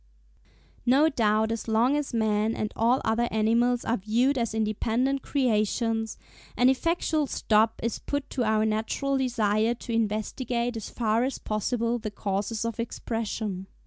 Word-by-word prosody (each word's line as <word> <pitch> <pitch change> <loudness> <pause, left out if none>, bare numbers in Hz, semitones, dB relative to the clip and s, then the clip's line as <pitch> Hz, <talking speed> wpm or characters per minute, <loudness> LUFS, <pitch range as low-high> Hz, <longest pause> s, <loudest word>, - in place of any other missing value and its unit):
No 275 +6 +4
doubt 220 -5 +1
as 230 0 -4
long 230 +5 +3
as 295 -1 -2
man 220 -1 +1
and 215 - -3
all 240 +4 +2
other 230 +2 +1
animals 235 +3 +2
are 235 - +1
viewed 235 +8 +1
as 230 -3 -1
independent 225 +5 0
creations, 225 -3 0 0.4
an 250 +1 +5
effectual 310 +1 +1
stop 220 -2 +2
is 230 - -2
put 285 -1 -3
to 255 - -1
our 215 -1 +2
natural 220 +6 -1
desire 225 -2 +1
to 235 0 -6
investigate 235 +2 -1
as 220 - -5
far 225 0 +1
as 265 0 -2
possible 230 +2 -1
the 215 - -4
causes 205 +2 -2
of 230 0 -4
Expression. 220 -4 -3
230 Hz, 145 wpm, -27 LUFS, 215-245 Hz, 0.4 s, an